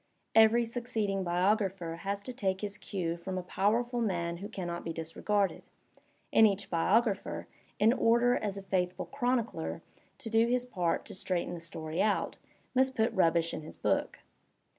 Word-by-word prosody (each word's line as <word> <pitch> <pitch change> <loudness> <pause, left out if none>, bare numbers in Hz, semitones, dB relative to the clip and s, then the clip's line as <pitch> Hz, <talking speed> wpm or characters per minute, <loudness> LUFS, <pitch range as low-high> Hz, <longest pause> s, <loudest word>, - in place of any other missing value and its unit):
Every 225 +1 +6
succeeding 225 -5 -2
biographer 185 -1 0
has 200 +2 -3
to 255 - -5
take 190 -6 -1
his 205 -1 -3
cue 170 -4 -3
from 185 +2 -5
a 185 - -3
powerful 235 +6 0
man 170 -5 -1
who 200 +4 -7
can 190 -5 -5
not 170 0 -4
be 165 - -3
disregarded; 180 +5 -1 0.7
and 220 - +8
each 200 -1 -2
biographer, 200 +5 +1 0.3
in 220 +3 +5
order 240 +1 +4
as 200 -2 -2
a 195 - -6
faithful 180 -2 -1
chronicler 230 - -1 0.3
to - - -6
do 225 +1 +4
his 250 +1 +1
part 180 -8 -1
to - - -9
straighten 180 -2 -2
the 175 - -5
stoiy 165 0 -4
out, 215 - +1 0.4
must 260 0 +2
put 225 +1 +1
rubbish 170 -3 +2
in - - -4
his 155 - -9
book. - - 0
195 Hz, 165 wpm, -31 LUFS, 175-225 Hz, 0.7 s, and